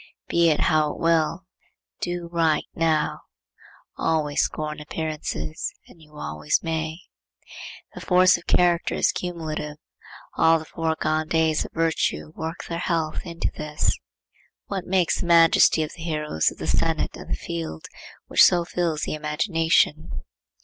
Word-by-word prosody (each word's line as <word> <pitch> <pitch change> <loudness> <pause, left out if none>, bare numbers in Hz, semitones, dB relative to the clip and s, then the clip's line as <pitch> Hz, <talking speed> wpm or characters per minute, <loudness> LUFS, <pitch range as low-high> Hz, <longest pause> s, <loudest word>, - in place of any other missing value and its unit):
Be 170 -1 +3
it 150 - +1
how 155 -2 +2
it - - -11
will, 165 +2 +1 0.6
do 175 -1 -3
right 165 -2 +2
now. 160 -2 0 0.8
Always 150 -3 +1
scorn 155 0 -3
appearances 150 - -4
and 165 - -18
you 150 -1 -18
always 75 - -1
may. 160 +1 -3 0.9
The - - -9
force 185 0 +5
of 170 - -8
character 175 -1 +2
is - - +3
cumulative. 160 -4 -4 0.6
All 165 0 +5
the 160 - -8
foregone 155 -1 -1
days 160 -1 +1
of - - -11
virtue 150 - 0
work 160 +1 -5
their 170 0 -3
health 165 -3 -1
into 170 0 -2
this. 150 0 -1 0.7
What 190 -3 -4
makes 185 -2 +2
the 175 - -3
majesty 165 -1 +5
of 155 - -6
the 165 - -12
heroes 150 - 0
of - - -12
the - - -5
senate - - 0
and - - -10
the - - 0
field, 80 -1 -6 0.4
which - - +5
so 175 -1 +5
fills 170 -3 -1
the - - -2
imagination? 155 - 0
160 Hz, 145 wpm, -24 LUFS, 150-170 Hz, 0.9 s, force